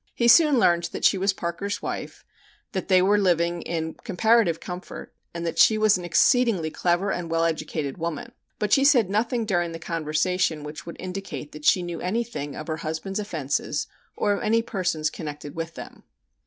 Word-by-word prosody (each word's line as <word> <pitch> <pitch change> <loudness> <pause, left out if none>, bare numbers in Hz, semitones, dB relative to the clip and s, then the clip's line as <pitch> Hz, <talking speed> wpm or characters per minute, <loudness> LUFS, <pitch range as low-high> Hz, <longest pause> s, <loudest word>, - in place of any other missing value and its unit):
He 235 - +2
soon 295 +3 +6
learned 170 -6 +3
that - - -2
she 195 - +4
was 195 +1 +2
Parker's 190 +2 -4
wife, - - -6 0.5
that 190 -4 -3
they 185 -2 +5
were 205 +2 +4
living 170 -2 +1
in 160 -1 -3
comparative 220 -4 +2
comfort, 180 0 -8 0.2
and 170 0 -5
that 165 0 -3
she 215 +6 +6
was 215 -1 +4
an 180 - -4
exceedingly 180 -1 +3
clever 175 +4 0
and 175 -2 -3
well 165 0 +1
educated 155 -2 -3
woman, 165 -3 -4 0.3
but 210 -1 0
she 270 - +5
said 245 -9 +4
nothing 230 +2 0
during 175 -5 0
the - - -5
conversation 165 0 -1
which 150 +2 -8
would 170 - -7
indicate 185 -5 -6
that 150 0 -10
she 180 - +4
knew 175 -1 -5
anything 180 -8 -3
of 155 - -6
her 155 -1 -3
husband's 165 +5 -4
offenses 150 -6 -2 0.3
or 205 - +1
of - - -3
any 225 +2 +2
persons 180 -8 -1
connected 150 -2 -7
with 165 0 -5
them. - - -10
175 Hz, 185 wpm, -25 LUFS, 160-205 Hz, 0.5 s, soon